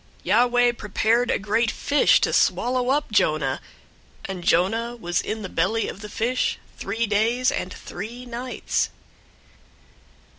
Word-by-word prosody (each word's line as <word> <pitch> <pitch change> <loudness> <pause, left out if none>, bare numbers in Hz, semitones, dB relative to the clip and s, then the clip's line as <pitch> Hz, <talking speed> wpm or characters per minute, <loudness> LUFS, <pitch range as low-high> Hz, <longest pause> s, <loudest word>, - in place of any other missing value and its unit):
001:017 - - -30
Yahweh 245 +4 +4
prepared 230 +2 0
a - - +2
great 220 +3 +1
fish 285 +5 +3
to - - 0
swallow 250 0 +2
up 285 -2 +1
Jonah, 155 -9 +1 0.6
and 185 -2 -5
Jonah 225 +9 +1
was 175 -6 -1
in 215 0 -4
the - - -3
belly 190 +6 0
of - - -7
the 210 - -8
fish 240 +4 0 0.2
three 225 +4 -2
days 230 +4 +2
and 185 - -3
three 230 +9 -8
nights. 245 +1 -2
225 Hz, 140 wpm, -24 LUFS, 200-245 Hz, 0.6 s, Yahweh